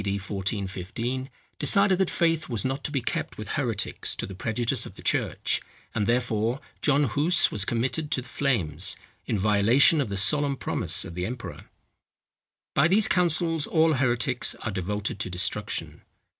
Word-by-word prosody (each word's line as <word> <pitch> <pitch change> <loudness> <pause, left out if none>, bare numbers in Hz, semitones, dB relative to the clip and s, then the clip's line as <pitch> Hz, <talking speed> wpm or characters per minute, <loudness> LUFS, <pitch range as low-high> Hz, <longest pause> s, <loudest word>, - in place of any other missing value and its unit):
D. 100 -1 -1
1415, 100 +5 -3 0.3
decided 200 -2 +4
that 190 - +2
faith 165 -3 +1
was 115 0 -1
not 135 +1 -2
to - - -2
be 140 -3 -1
kept - - -3
with - - -7
heretics - - -2
to - - -3
the 95 - -8
prejudice 110 +5 -1
of - - -13
the - - -13
church; - - 0 0.3
and, 105 -2 0
therefore, 120 0 0 0.2
John 145 -1 +3
Huss 155 +5 +3
was 105 -2 -1
committed 125 +7 -1
to 130 - +1
the - - -15
flames, 100 - 0 0.3
in 110 - 0
violation 110 - +4
of 130 - -2
the 100 - -3
solemn 140 +8 +1
promise - - -1
of - - -8
the 90 +1 -3
emperor. 120 0 -7 1.1
By 140 - +4
these 200 +4 +6
councils 165 -3 +2
all 160 0 +3
heretics 125 -1 +1
are 115 - -2
devoted 100 +1 -3
to 105 - -3
destruction. 90 0 -3
120 Hz, 165 wpm, -26 LUFS, 100-145 Hz, 1.1 s, these